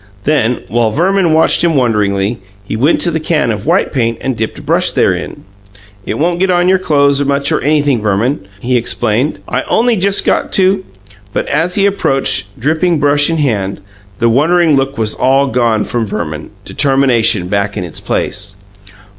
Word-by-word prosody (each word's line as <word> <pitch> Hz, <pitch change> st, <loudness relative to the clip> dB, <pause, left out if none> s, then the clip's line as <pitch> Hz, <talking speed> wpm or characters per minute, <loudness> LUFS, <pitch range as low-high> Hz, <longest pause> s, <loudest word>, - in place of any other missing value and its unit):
Then, 125 Hz, -5 st, 0 dB
while 120 Hz, -1 st, +1 dB
Verman 180 Hz, -, +1 dB
watched 160 Hz, +1 st, +3 dB
him 170 Hz, -2 st, +2 dB
wonderingly, 105 Hz, -4 st, 0 dB, 0.2 s
he 100 Hz, -, -5 dB
went 140 Hz, +9 st, +2 dB
to 175 Hz, -, 0 dB
the 160 Hz, -, -1 dB
can 155 Hz, -6 st, 0 dB
of 110 Hz, +6 st, -5 dB
white 175 Hz, +4 st, +1 dB
paint 115 Hz, -4 st, 0 dB
and 130 Hz, -1 st, -3 dB
dipped 110 Hz, 0 st, -4 dB
a -, -, -9 dB
brush -, -, +2 dB
therein. -, -, -1 dB, 0.6 s
"It -, -, -2 dB
won't 170 Hz, +3 st, 0 dB
get 190 Hz, +1 st, +1 dB
on 175 Hz, 0 st, +2 dB
your 190 Hz, 0 st, +3 dB
clo'es 140 Hz, -4 st, +2 dB
much, 140 Hz, 0 st, 0 dB
or -, -, 0 dB
anything, 145 Hz, -5 st, +1 dB
Verman," 105 Hz, +2 st, -1 dB
he 125 Hz, +1 st, +1 dB
explained. 120 Hz, +3 st, -1 dB
"I -, -, -1 dB
only 235 Hz, +1 st, +2 dB
just 200 Hz, 0 st, 0 dB
got -, -, 0 dB
to 190 Hz, 0 st, +2 dB, 0.3 s
" 100 Hz, 0 st, -26 dB
But -, -, -1 dB
as 165 Hz, +5 st, 0 dB
he 200 Hz, -, +2 dB
approached, 135 Hz, -9 st, 0 dB
dripping 160 Hz, +6 st, +1 dB
brush 145 Hz, 0 st, +3 dB
in 165 Hz, -, 0 dB
hand, 105 Hz, -10 st, -1 dB, 0.4 s
the 115 Hz, -, +1 dB
wondering 155 Hz, +6 st, +3 dB
look 135 Hz, 0 st, -1 dB
was 110 Hz, -1 st, 0 dB
all 135 Hz, +2 st, +2 dB
gone 115 Hz, -4 st, +1 dB
from 115 Hz, -2 st, -3 dB
Verman; 75 Hz, -5 st, -5 dB, 0.2 s
determination 130 Hz, -9 st, +1 dB
took 100 Hz, 0 st, -1 dB
its 90 Hz, -5 st, -5 dB
place. 100 Hz, -1 st, -3 dB
135 Hz, 180 wpm, -13 LUFS, 110-160 Hz, 0.6 s, watched